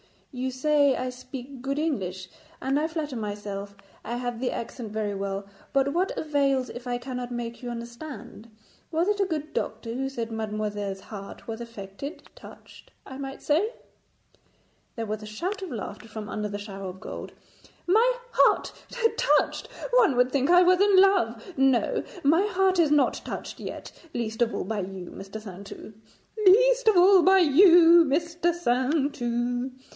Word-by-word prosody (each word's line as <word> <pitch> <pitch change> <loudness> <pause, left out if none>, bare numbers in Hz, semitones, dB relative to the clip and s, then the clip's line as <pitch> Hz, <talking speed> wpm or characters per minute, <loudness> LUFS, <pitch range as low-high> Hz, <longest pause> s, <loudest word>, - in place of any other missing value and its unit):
'You 255 +1 -2
say 285 +1 +3
I 255 0 -3
speak 255 +1 -9
good 275 +2 -2
English, 190 - -2 0.3
and 270 +2 +1
I 310 - 0
flatter 310 -5 -4
myself 205 -2 -5 0.3
I 235 +3 -4
have 245 -1 -3
the 250 0 -1
accent 230 -1 -6
very 210 -1 -2
well, 195 0 -3 0.3
but 275 0 +2
what 365 +3 0
avails 275 -4 +1
if 245 +1 -8
I 245 0 -1
cannot 250 0 -6
make 235 0 -5
you 245 - -5
understand? 235 0 -8 0.4
Was 335 +4 +1
it 415 -1 0
a 395 - +3
good 310 -3 -4
doctor 230 +1 -3
who 270 +2 -2
said 230 -4 -5
mademoiselle's 210 -3 -3
heart 200 -1 -10
was 225 0 -5
affected; 230 - -8
touched, - - -15
I 265 - -9
might 270 -1 -7
say?' 360 +11 +1 1.2
There 230 - -3
was 215 0 -4
a - - -8
shout 365 - -4
of 380 - -5
laughter 220 -3 -6
from 215 -1 -7
under 210 -1 -3
the 205 0 -5
shower 200 -1 -8
of 185 +1 -9
gold. - - -7 0.5
'My 450 +7 +4 0.2
heart - - +3 0.5
touched! 295 +10 +2 0.2
One 475 - +4
would 250 +1 +3
think 275 +1 +1
I 355 +1 +7
was 365 +1 +4
in 400 -2 +6
love. 305 - +3
No, 265 -2 +2 0.2
my 330 +8 +4
heart 380 -2 +2
is 325 -3 +4
not 295 -1 +2
touched - - -6
yet; - - -7 0.2
least 225 -1 -3
of 235 -1 +2
all - - -2
by 215 +2 -3
you, 190 -1 -6
Mr. 195 +3 -8
Saintou. 200 +1 -10 0.5
'Least - - +6
of 430 -4 +6
all 370 +1 +7
by 380 +3 +6
you, 340 +1 +7
Mr. 335 +4 0
Saintou.' 250 -4 0
255 Hz, 165 wpm, -26 LUFS, 220-325 Hz, 1.2 s, I